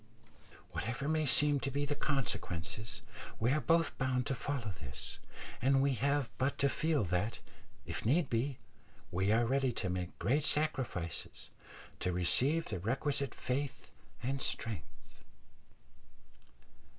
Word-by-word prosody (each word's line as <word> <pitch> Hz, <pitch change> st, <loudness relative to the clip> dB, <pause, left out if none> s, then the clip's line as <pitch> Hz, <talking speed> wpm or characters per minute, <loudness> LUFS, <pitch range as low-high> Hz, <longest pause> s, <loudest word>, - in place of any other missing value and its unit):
Whatever 125 Hz, +5 st, -2 dB
may 155 Hz, -1 st, +2 dB
seem 145 Hz, +2 st, +5 dB
to 130 Hz, -, -1 dB
be 145 Hz, +2 st, 0 dB
the 145 Hz, -, 0 dB
consequences, 110 Hz, -, -2 dB, 0.4 s
we 120 Hz, +3 st, +3 dB
are 150 Hz, +2 st, +2 dB
both 165 Hz, -1 st, +3 dB
bound 130 Hz, -1 st, +1 dB
to -, -, 0 dB
follow 125 Hz, -3 st, -2 dB
this, 70 Hz, -5 st, -6 dB, 0.4 s
and 135 Hz, +2 st, +4 dB
we 140 Hz, 0 st, +3 dB
have 140 Hz, +1 st, +1 dB
but 130 Hz, +2 st, +1 dB
to 140 Hz, -, +3 dB
feel 155 Hz, -3 st, +1 dB
that, 95 Hz, +4 st, 0 dB, 0.5 s
if -, -, -4 dB
need 145 Hz, +7 st, +3 dB
be, 125 Hz, +3 st, 0 dB, 0.5 s
we 95 Hz, +3 st, +2 dB
are 115 Hz, +2 st, +4 dB
ready 135 Hz, +1 st, +2 dB
to 95 Hz, -5 st, -1 dB
make 90 Hz, -1 st, -3 dB
great 140 Hz, +8 st, +2 dB
sacrifices 140 Hz, -, -2 dB, 0.5 s
to 90 Hz, -, 0 dB
receive 130 Hz, -, +3 dB
the 95 Hz, -, -3 dB
requisite 135 Hz, -, -1 dB
faith 135 Hz, +2 st, -3 dB, 0.3 s
and 135 Hz, +2 st, -1 dB
strength. 80 Hz, -, -3 dB
130 Hz, 135 wpm, -34 LUFS, 110-140 Hz, 0.5 s, seem